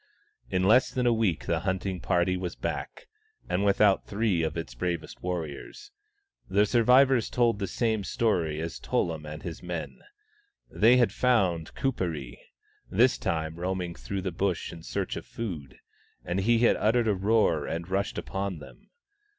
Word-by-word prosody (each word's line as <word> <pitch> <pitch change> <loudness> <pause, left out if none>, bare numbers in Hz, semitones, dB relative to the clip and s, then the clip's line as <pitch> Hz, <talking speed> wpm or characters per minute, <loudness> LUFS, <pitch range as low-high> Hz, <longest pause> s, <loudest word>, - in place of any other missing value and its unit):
In 95 0 0
less 115 +7 +5
than 125 -1 -1
a 120 - +4
week 110 -8 0
the - - 0
hunting 95 0 -2
party 90 +2 +1
was 90 -1 -4
back, - - -5 0.4
and 95 +3 0
without 100 0 +3
three 100 -4 +1
of 80 0 -2
its 70 -7 -5
bravest 85 +6 -4
warriors. 90 - -5 0.6
The 100 +2 +4
survivors 125 +2 +4
told 120 -4 +2
the 100 - -2
same 110 +1 0
story 85 -8 0
as 80 +1 -5
Tullum 80 -3 -1
and 75 +1 -8
his 85 -3 -6
men. 85 -2 -5 0.7
They 115 +4 +5
had 120 -6 +3
found 95 -12 +1
Kuperee, 85 - -3 0.5
this 120 +6 +3
time 80 0 -2
roaming 90 -1 -2
through 100 +3 -5
the 95 - -2
Bush 90 0 -2
in 85 - -10
search 95 +3 -3
of - - -6
food; 105 - -6 0.5
and 90 +2 -1
he 115 +4 +3
had 120 +1 +4
uttered 115 +2 +2
a 105 - +3
roar 100 -5 +2
and 85 +1 -4
rushed 95 +1 -1
upon 95 -2 -3
them. 75 - -14
95 Hz, 160 wpm, -28 LUFS, 85-110 Hz, 0.7 s, less